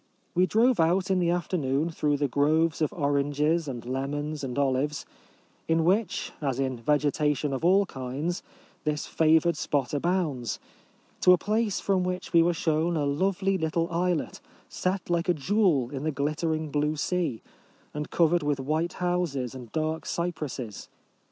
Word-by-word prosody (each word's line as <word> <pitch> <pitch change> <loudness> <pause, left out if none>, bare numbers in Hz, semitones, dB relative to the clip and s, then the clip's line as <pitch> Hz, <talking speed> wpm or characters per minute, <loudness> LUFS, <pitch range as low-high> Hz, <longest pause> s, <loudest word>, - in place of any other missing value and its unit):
We 185 +1 +3
drove 230 +2 +3
out 180 +4 +2
in 190 - +3
the 175 -1 +2
afternoon 165 -3 0
through 150 -2 0
the 145 0 +1
groves 155 +5 +2
of 155 - +1
oranges 145 +2 +1
and 120 -4 -5
lemons 145 +3 -3
and 125 -1 -4
olives, 140 +1 0 0.6
in 165 0 +2
which, 195 +2 +1
as 135 -3 -1
in 130 -1 0
vegetation 150 +2 +1
of 135 - -3
all 195 +3 +5
kinds, 140 +4 -4 0.4
this 150 -1 -1
favoured 160 +1 +3
spot 140 -3 -1
abounds, 150 -6 -1 0.6
to 180 - +7
a - - +5
place 215 +1 0
from 190 -2 +1
which 180 0 -4
we 170 - +7
were 170 +1 +3
shown 165 -2 +1
a 145 - 0
lovely 190 +6 0
little 165 +2 -1
islet, 175 -1 -1 0.3
set 185 0 -2
like 170 +1 0
a 175 - +4
jewel 155 - +2
in 135 -2 -4
the 155 +1 -1
glittering 155 +2 -1
blue 150 +1 0
sea, 160 -5 -1 0.5
and 150 0 -4
covered 170 0 +3
with 145 -2 0
white 155 +5 -1
houses 175 -9 -1
and 125 -4 -10
dark 160 +1 -2
cypresses. 145 - -4
155 Hz, 160 wpm, -27 LUFS, 140-175 Hz, 0.6 s, to